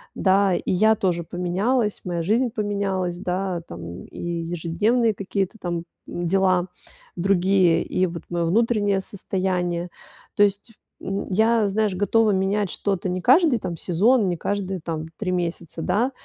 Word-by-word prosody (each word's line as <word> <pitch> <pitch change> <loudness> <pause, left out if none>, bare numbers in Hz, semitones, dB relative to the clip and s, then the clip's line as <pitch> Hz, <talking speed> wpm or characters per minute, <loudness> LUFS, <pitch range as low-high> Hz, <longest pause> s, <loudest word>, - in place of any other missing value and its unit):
да. 195 0 +3
И - - -2
я 215 +4 +4
тоже 175 -4 0
поменялась, 195 +7 -1
моя 170 -2 -2
жизнь 235 +7 +2
поменялась, 200 -5 -2
да, 180 -1 -2
там, 85 0 -8
и - - -12
ежедневные 175 +7 0
какие-то 195 +1 -2
там 170 -1 -3 0.2
дела 185 +1 +1 0.5
другие, 185 -2 +3
и 185 - 0
вот 170 -1 -7
моё 170 -1 -1
внутреннее 205 0 +2
состояние. 180 -3 -2 0.5
То 205 - +5
есть, 205 +3 0 0.3
м, 195 +1 -3
я, 220 +2 +3
знаешь, 205 -1 0
готова 215 +2 +3
менять 195 +1 0
что-то 195 -2 -2
не 180 0 -2
каждый 265 - +5
там 175 -4 -5
сезон, 205 +7 +3
не 175 - -2
каждые 195 0 -2
там 160 -1 -4
3 205 - -3
месяца, 170 -2 -3
да, 220 +8 +1
190 Hz, 145 wpm, -23 LUFS, 175-205 Hz, 0.5 s, То